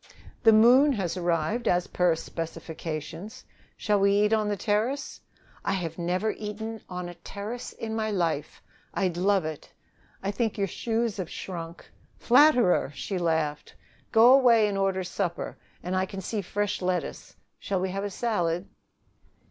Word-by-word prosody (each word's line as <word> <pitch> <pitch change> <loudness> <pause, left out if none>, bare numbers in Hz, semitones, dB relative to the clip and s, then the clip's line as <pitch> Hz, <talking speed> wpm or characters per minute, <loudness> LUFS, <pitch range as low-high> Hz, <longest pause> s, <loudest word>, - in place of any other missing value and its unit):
"The 225 - +7
moon 250 +6 +6
has 190 -7 -2
arrived, 175 +6 0
as 180 0 +2
per 180 -2 +2
specifications. 165 +2 -6 0.3
Shall 210 -1 +1
we 200 0 +4
eat 210 +2 +3
on 215 -1 +2
the 205 -1 -1
terrace?" 230 +8 -1 0.4
"I 200 - 0
have 170 -3 -3
never 180 +5 0
eaten 220 +1 -6
on 180 -1 -5
a 175 - -7
terrace 200 +7 -7
in 220 -1 -5
my 220 -1 -1
life. 170 -7 -2 0.3
I'd 185 -4 0
love 190 0 +2
it." 155 -2 -6 0.5
"I 195 - 0
think 225 +1 -1
your 200 - +1
shoes 225 +3 -2
have 185 -4 -4
shrunk." 170 -2 -7 0.3
"Flatterer!" 250 - +4
She 185 +6 -3
laughed. 160 -3 -1 0.4
"Go 230 +3 +7
away 235 -5 +6
and 205 - -2
order 195 -1 0
supper. 180 -1 -3 0.3
And 180 +1 -2
I 185 0 +1
can 195 - -7
see 210 +3 -3
fresh 205 +2 -2
lettuce. 180 -1 -3 0.2
Shall 195 -2 -2
we 185 0 -1
have 195 +1 -3
a 205 - -2
salad?" 180 -5 -1
195 Hz, 155 wpm, -27 LUFS, 175-220 Hz, 0.5 s, The